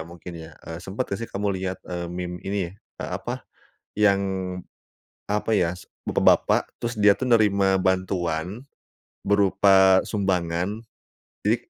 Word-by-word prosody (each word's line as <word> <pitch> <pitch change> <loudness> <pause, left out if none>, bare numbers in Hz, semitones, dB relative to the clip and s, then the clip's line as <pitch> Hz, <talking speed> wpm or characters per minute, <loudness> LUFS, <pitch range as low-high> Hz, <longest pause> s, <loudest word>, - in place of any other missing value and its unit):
mungkin 85 +1 -10 0.2
ya, - - -14
eee, 80 -1 -6
sempat 100 +7 -4
gak 100 - -1
sih 115 - -5
kamu 100 +1 -3
lihat, 95 0 -2
eee, 85 -1 -4
meme 90 0 -5
ini, 95 -3 -3
eee, 100 - -10
apa, - - -6 0.5
yang 100 -2 +4 1.1
apa 105 +2 -1
ya, 90 -5 +2
s 90 - -12 0.2
bapak-bapak, - - +3
terus 120 0 -3
dia 105 -1 +4
tuh 130 - -2
nerima 100 -5 +4
bantuan 95 +1 -1 0.6
berupa 95 -1 +5
sumbangan, 95 +1 -1 0.6
jadi - - +4
95 Hz, 135 wpm, -24 LUFS, 90-105 Hz, 1.1 s, berupa